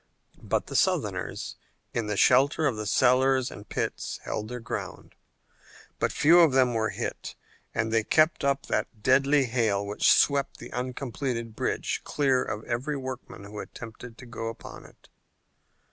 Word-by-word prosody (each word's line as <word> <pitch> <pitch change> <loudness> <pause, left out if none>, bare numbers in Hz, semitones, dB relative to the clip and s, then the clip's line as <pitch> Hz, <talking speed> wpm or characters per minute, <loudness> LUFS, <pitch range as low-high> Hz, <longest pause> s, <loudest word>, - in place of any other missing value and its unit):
But - - -1
the - - -8
Southerners, - - 0 0.4
in 115 -3 -1
the 105 -1 -2
shelter 140 +7 +4
of 135 -5 +1
the 105 -1 -4
cellars 130 +2 +3
and 105 - -11
pits, - - -3
held 105 - -4
their 125 +2 -6
ground. 120 - -6 0.9
But - - +1
few 165 +4 +5
of 165 -5 +6
them 130 -2 +4
were 110 -1 0
hit - - -5 0.4
and 110 0 0
they 110 -1 +3
kept 155 +7 +3
up 140 0 +1
that 105 -4 -3
deadly 135 +2 +4
hail 110 -5 0
which 105 +1 +3
swept 140 -1 +3
the - - -10
uncompleted 125 -2 -4
bridge - - -2
clear 135 -3 +1
of 105 +1 -5
every 130 +5 -2
workman 130 -6 -7
who 105 +1 -8
attempted 115 +1 -9
to 125 - -11
go 115 -2 -6
upon 115 - -8
it. - - -19
125 Hz, 160 wpm, -27 LUFS, 110-135 Hz, 0.9 s, of